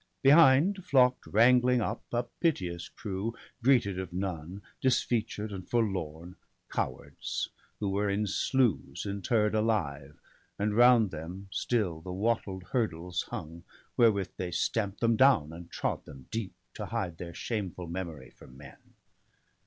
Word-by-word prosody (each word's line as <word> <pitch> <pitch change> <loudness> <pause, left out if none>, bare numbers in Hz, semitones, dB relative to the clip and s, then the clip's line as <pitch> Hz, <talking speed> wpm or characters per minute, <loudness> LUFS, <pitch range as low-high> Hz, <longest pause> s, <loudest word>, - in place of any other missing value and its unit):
Behind 155 +6 +6
flock'd 130 -5 +3
wrangling 125 +3 +5
up 110 +1 -2
a 120 0 +1
piteous 95 - -2
crew, 105 +3 -4 0.3
Greeted 115 -7 +3
of 95 -2 -5
none, 90 0 -4 0.2
disfeatured 115 -4 0
and 95 -2 -7
forlorn 90 -7 -2 0.2
— - - -47
Cowards, 65 - -3 0.3
who 105 - -1
were 100 +1 0
in 100 +2 0
sloughs 105 - 0
interr'd 105 +2 +1
alive; 80 -11 -1 0.4
And 105 +1 0
round 120 -4 +6
them 90 +5 -7
still 95 -11 -1
the 90 +2 -7
wattled 95 -1 -1
hurdles 90 -8 -1
hung 85 -7 -7 0.3
Wherewith 100 -6 +3
they 90 - -3
stamp'd 100 +3 -1
them 115 -1 +3
down, 105 - +4
and 85 0 -10
trod - - -2
them 65 -3 -12
deep. 110 -4 -4 0.2
To - - -6
hide 85 -4 -3
their 85 -1 -7
shameful 95 -6 -4
memory 85 -5 -6
from 65 - -16
men. 70 -1 -13
100 Hz, 135 wpm, -30 LUFS, 85-115 Hz, 0.4 s, Behind